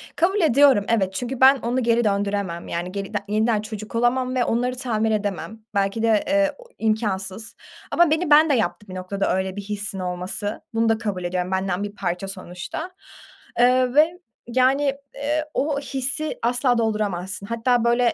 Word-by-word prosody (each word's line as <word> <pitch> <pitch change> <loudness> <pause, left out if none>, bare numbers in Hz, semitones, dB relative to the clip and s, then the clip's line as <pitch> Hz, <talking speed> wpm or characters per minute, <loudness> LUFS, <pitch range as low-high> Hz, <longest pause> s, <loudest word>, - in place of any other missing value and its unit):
Kabul 380 +4 +2
ediyorum 275 -7 +5
evet, 190 -5 +1
çünkü 250 +3 -4
ben 265 +1 +8
onu 245 +2 -1
geri 235 0 +3
döndüremem, 200 -4 -1
yani, 175 +2 -3
geri 200 +1 -5
de 205 - +1
yeniden 215 +1 +1
çocuk 215 0 -8
olamam 250 +2 +1
ve 250 - +2
onları 250 +2 0
tamir 225 -4 0
edemem. 210 +1 -3 0.2
Belki 200 +3 0
de, 220 -2 +3
eee, 295 0 +2
o - - -14
imkânsız. 215 -1 -2 0.4
Ama 345 -3 +4
beni 320 +1 +1
ben 305 +1 +7
de - - +4
yaptı 220 -3 -1
bir 185 - -8
noktada 185 +1 -1
öyle 190 0 -2
bir 205 - -4
hissin 205 -1 -5
olması. 180 +3 -4
Bunu 225 0 +2
da 225 - +3
kabul 205 -5 -3
ediyorum, 180 +1 -2
benden 190 0 -1
bir 205 0 -6
parça 180 0 -3
sonuçta, 185 - -7 0.7
eee, 250 +1 +4
ve, 330 +4 +4 0.3
yani, 260 +4 +3 0.3
eee, 300 +2 -1
o 285 0 0
hissi 275 +3 -3
asla 245 +1 +2
dolduramazsın. 200 -4 -2
Hatta, 230 +2 +1
böyle, 240 0 +3
225 Hz, 170 wpm, -23 LUFS, 200-255 Hz, 0.7 s, ben